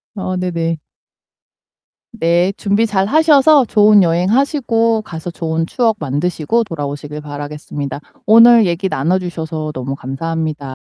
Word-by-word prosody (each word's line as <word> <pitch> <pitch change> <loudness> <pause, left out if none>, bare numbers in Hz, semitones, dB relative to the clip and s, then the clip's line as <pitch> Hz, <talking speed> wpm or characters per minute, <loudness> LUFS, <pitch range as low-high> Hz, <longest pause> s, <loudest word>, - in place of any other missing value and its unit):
어 185 -2 -4
네네. 165 -2 -2 1.4
네. 175 +3 +1
준비 205 +3 +1
잘하셔서 280 +7 +4
좋은 210 -2 +5
여행하시고 225 - +1
가서 170 -1 -7
좋은 165 -1 -2
추억 225 +2 0
만드시고 160 - -1
돌아오시길 150 -3 -6
바라겠습니다. 145 -1 -6 0.3
오늘 230 0 +7
얘기 180 +2 -1
나눠 165 +8 0
주셔서 160 -3 -5
너무 135 +2 -5
감사합니다. 150 0 -4
175 Hz, 300 characters per minute, -16 LUFS, 155-215 Hz, 1.4 s, 오늘